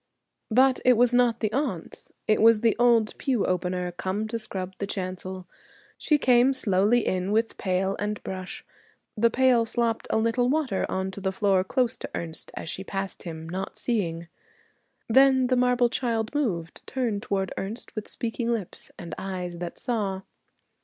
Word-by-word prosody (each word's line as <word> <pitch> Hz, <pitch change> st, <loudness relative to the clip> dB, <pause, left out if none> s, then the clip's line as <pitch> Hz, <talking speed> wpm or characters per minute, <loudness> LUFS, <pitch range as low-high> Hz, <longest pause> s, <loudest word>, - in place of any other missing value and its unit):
But 255 Hz, +3 st, +4 dB
it 255 Hz, -, +6 dB
was 245 Hz, +1 st, +4 dB
not 245 Hz, -2 st, +3 dB
the 215 Hz, -1 st, 0 dB
aunts. 250 Hz, -, -3 dB, 0.2 s
It 215 Hz, -, +3 dB
was 225 Hz, -1 st, +6 dB
the 230 Hz, -2 st, +3 dB
old 235 Hz, -3 st, +4 dB
pew 250 Hz, -6 st, +1 dB
opener, 180 Hz, 0 st, -1 dB
come 190 Hz, +4 st, -3 dB
to 230 Hz, +1 st, -2 dB
scrub 190 Hz, -3 st, -5 dB
the 200 Hz, -, -2 dB
chancel. 185 Hz, -1 st, -4 dB, 0.5 s
She 300 Hz, -, +2 dB
came 250 Hz, -1 st, +4 dB
slowly 215 Hz, -1 st, +2 dB
in 185 Hz, +1 st, -1 dB
with 225 Hz, +2 st, +1 dB
pail 190 Hz, +1 st, 0 dB
and 210 Hz, +1 st, -2 dB
brush; 185 Hz, -1 st, -6 dB, 0.5 s
the 230 Hz, +1 st, +4 dB
pail 250 Hz, -1 st, +4 dB
slopped 230 Hz, 0 st, -1 dB
a -, -, +2 dB
little 230 Hz, +2 st, +2 dB
water 275 Hz, -9 st, 0 dB
on 190 Hz, 0 st, -2 dB
to 200 Hz, -, -8 dB
the 190 Hz, 0 st, 0 dB
floor 190 Hz, -1 st, +2 dB
close 250 Hz, +4 st, 0 dB
to -, -, -7 dB
Ernest 165 Hz, -1 st, -5 dB
as -, -, -6 dB
she 190 Hz, -, -3 dB
passed 195 Hz, 0 st, -4 dB
him, 160 Hz, -2 st, -7 dB
not 190 Hz, +3 st, -5 dB
seeing. 170 Hz, -8 st, -1 dB, 0.8 s
Then 265 Hz, +2 st, +5 dB
the 255 Hz, +1 st, +2 dB
marble 250 Hz, -1 st, +3 dB
child 235 Hz, -1 st, -1 dB
moved, 185 Hz, -, -2 dB
turned 235 Hz, -6 st, -1 dB
toward 195 Hz, -2 st, -2 dB
Ernest 215 Hz, +5 st, -6 dB
with 215 Hz, -, -5 dB
speaking 235 Hz, 0 st, -2 dB
lips 220 Hz, -6 st, -4 dB
and 170 Hz, -, -7 dB
eyes 180 Hz, -2 st, -5 dB
that 175 Hz, -1 st, -5 dB
saw. 200 Hz, -6 st, -2 dB
215 Hz, 170 wpm, -26 LUFS, 190-245 Hz, 0.8 s, it